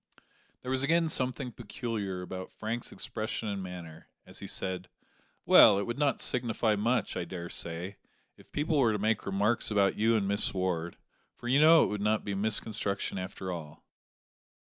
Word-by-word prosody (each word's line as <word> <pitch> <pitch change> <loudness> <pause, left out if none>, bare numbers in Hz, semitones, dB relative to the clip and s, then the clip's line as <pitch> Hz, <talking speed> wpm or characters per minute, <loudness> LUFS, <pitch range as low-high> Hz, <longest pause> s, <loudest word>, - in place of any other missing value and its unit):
There 130 - -4
was 130 0 +2
again 165 +3 +2
something 130 -2 -1
peculiar 105 -5 -4
about 95 0 -7
Frank's 115 +2 -5
expression 110 0 -4
and 100 -1 -3
manner, 85 -4 -9 0.2
as - - -5
he - - -7
said, 95 -1 -2 0.6
"Well, - - +8
it 100 - 0
would 120 +5 -4
not 145 -2 +2
signify 115 -3 +1
much, 115 +5 0
I - - -2
daresay, 85 +1 -5 0.4
if - - -20
people 150 0 0
were 115 -5 +4
to - - 0
make 110 +1 0
remarks 105 +4 +1
about 100 -2 +2
you 115 +2 +3
and 100 -3 +1
Miss 100 0 +1
Ward, 90 -3 -2 0.4
for 120 - -9
you 135 +4 +4
know 160 +1 +8
it - - 0
would 105 -1 -3
not 105 +1 +1
be 100 - -2
misconstruction 100 -1 -1
after 95 0 -5
all." 80 -4 -8
105 Hz, 170 wpm, -30 LUFS, 95-120 Hz, 0.6 s, Well